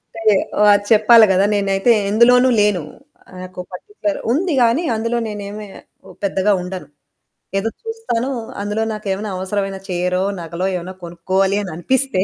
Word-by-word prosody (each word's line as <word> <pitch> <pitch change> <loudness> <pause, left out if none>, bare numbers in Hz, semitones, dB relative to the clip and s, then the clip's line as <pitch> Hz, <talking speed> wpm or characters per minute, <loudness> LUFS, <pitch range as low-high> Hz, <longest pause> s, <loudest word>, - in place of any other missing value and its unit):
టయె 220 -3 +3 0.3
వా 210 - +7 0.2
చెప్పాలి 225 +1 +7
గదా! 190 +1 +3
నేనైతే 195 +3 +2 0.2
ఎందులోనూ 245 +4 +5
లేను. 205 -5 +1 0.6
నాకు 185 0 -10
పర్టిక్యులర్ 310 - -4
ఉంది 335 +6 0
గానీ, 240 +7 +3
అందులో 230 +2 -1
నేనేమి 210 0 -7 0.4
ఓ - - -14
పెద్దగా 200 +1 +1
ఉండను. 180 +1 -7 0.7
ఏదో 205 +3 0
చూస్తానూ, 450 - -3 0.3
అందులో 205 +2 -2
నాకేవైనా 210 0 -4
అవసరమైన 195 +1 -3
చీరో, 180 0 -1 0.2
నగలో 170 +2 -4
ఏవన్నా 180 +1 -5
కొనుక్కోవాలి 185 +3 0
అననిపిస్తే 190 +5 0
205 Hz, 130 wpm, -19 LUFS, 185-230 Hz, 0.7 s, వా